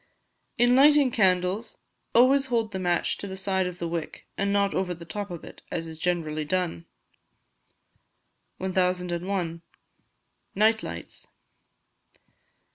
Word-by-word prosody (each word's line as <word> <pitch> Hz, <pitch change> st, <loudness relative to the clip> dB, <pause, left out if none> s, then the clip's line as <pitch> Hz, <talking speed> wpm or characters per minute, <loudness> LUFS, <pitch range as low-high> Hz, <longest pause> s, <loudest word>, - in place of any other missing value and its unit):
In 245 Hz, +1 st, +5 dB
lighting 285 Hz, -1 st, +6 dB
candles 190 Hz, +1 st, +1 dB, 0.4 s
always 265 Hz, +3 st, +5 dB
hold 230 Hz, -4 st, 0 dB
the 190 Hz, -, -4 dB
match 175 Hz, -2 st, 0 dB
to 200 Hz, -, -5 dB
the 190 Hz, 0 st, -6 dB
side 190 Hz, -1 st, 0 dB
of 180 Hz, -1 st, -6 dB
the 170 Hz, -, -3 dB
wick, 165 Hz, -2 st, -5 dB
and 200 Hz, 0 st, 0 dB
not 200 Hz, 0 st, +2 dB
over 180 Hz, -2 st, -1 dB
the 170 Hz, 0 st, -11 dB
top 205 Hz, +5 st, -5 dB
of 175 Hz, -2 st, -7 dB
it, -, -, -12 dB
as 165 Hz, -, -3 dB
is 160 Hz, -1 st, -9 dB
generally 155 Hz, -3 st, -1 dB
done. 170 Hz, +1 st, -2 dB, 1.7 s
1001. 180 Hz, -2 st, -1 dB, 0.9 s
Night 220 Hz, +2 st, +3 dB
Lights. -, -, -8 dB
185 Hz, 125 wpm, -26 LUFS, 175-210 Hz, 1.7 s, lighting